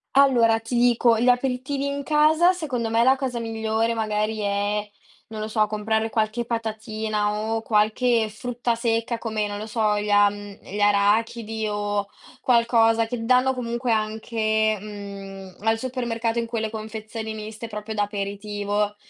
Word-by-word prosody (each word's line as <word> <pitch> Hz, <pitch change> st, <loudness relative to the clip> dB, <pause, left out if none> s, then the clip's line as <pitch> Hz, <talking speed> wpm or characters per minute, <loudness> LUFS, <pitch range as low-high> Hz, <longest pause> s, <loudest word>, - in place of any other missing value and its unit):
Allora 240 Hz, -5 st, +5 dB
ti 225 Hz, +2 st, -5 dB
dico, 235 Hz, -1 st, +4 dB
gli 245 Hz, -, +1 dB
aperitivi 260 Hz, +2 st, 0 dB
in 280 Hz, 0 st, -2 dB
casa 310 Hz, +4 st, +4 dB
secondo 255 Hz, -10 st, -3 dB
me 230 Hz, +1 st, +3 dB
la 260 Hz, +2 st, +5 dB
cosa 260 Hz, -3 st, -3 dB
migliore 225 Hz, 0 st, -1 dB
magari 215 Hz, 0 st, -1 dB
è, 205 Hz, +1 st, -1 dB, 0.4 s
non 220 Hz, -1 st, -7 dB
lo 215 Hz, -, -3 dB
so, 215 Hz, -1 st, +1 dB
comprare 220 Hz, +1 st, -1 dB
qualche 220 Hz, +2 st, -1 dB
patatina 220 Hz, -2 st, -2 dB
o 220 Hz, +1 st, -2 dB
qualche 220 Hz, +2 st, +2 dB
frutta 240 Hz, +2 st, -2 dB
secca 230 Hz, 0 st, -1 dB
come 215 Hz, -2 st, -2 dB
non 205 Hz, 0 st, -4 dB
lo 215 Hz, -, -6 dB
so, 210 Hz, -2 st, +1 dB
gli 210 Hz, 0 st, -3 dB
a 205 Hz, 0 st, +6 dB
mhmm, 205 Hz, 0 st, -10 dB
gli 205 Hz, +2 st, -6 dB
arachidi 215 Hz, +2 st, +1 dB
o 205 Hz, -1 st, -2 dB, 0.3 s
qualcosa, 230 Hz, -2 st, +3 dB
che 230 Hz, 0 st, -4 dB
danno 255 Hz, +2 st, +3 dB
comunque 240 Hz, -1 st, -2 dB
anche, 220 Hz, 0 st, 0 dB
mhmm, 195 Hz, -2 st, -9 dB
al 225 Hz, +2 st, +1 dB
supermercato 235 Hz, -2 st, -2 dB
in 230 Hz, -, -2 dB
quelle 225 Hz, -2 st, -2 dB
confezioni 220 Hz, 0 st, -6 dB
miste 215 Hz, +2 st, -7 dB
proprio 210 Hz, 0 st, -6 dB
da 210 Hz, -, -1 dB
aperitivo, 205 Hz, 0 st, -2 dB
220 Hz, 155 wpm, -24 LUFS, 210-235 Hz, 0.4 s, a